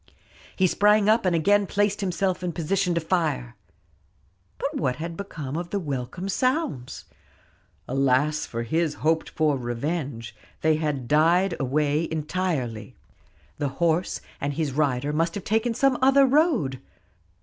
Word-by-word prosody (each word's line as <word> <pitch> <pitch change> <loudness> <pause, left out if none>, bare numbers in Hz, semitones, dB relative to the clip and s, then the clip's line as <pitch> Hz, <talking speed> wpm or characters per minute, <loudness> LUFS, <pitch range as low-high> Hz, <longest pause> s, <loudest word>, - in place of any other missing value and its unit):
He 190 - +3
sprang 210 +3 +4
up 220 -2 +3
and 175 - +2
again 200 +5 +3
placed 205 +1 0
himself 185 0 -1
in 180 -2 -3
position 180 +2 0
to - - +2
fire. 160 - -1 1.0
But 285 +2 -3
what 130 -4 0
had 165 +3 -5
become 155 -7 -6
of 170 +1 -4
the 200 - -1
welcome 145 +3 -4
sounds? 255 - -1 0.8
Alas 135 +3 +1
for 115 0 -4
his 160 +5 0
hoped 160 0 +2
for 150 -3 +1
revenge; 120 -1 -4 0.3
they 155 -1 +3
had 150 -5 -2
died 170 +5 +3
away 150 +3 +1
entirely. 155 -8 -3 0.6
The 145 -2 0
horse 170 +1 +1 0.2
and 145 +1 -2
his 155 -3 -1
rider 140 0 0
must 165 +2 0
have 200 - -5
taken 225 +2 0
some 270 0 +2
other 270 +1 +6
road. 265 - +2
165 Hz, 140 wpm, -25 LUFS, 140-195 Hz, 1.0 s, other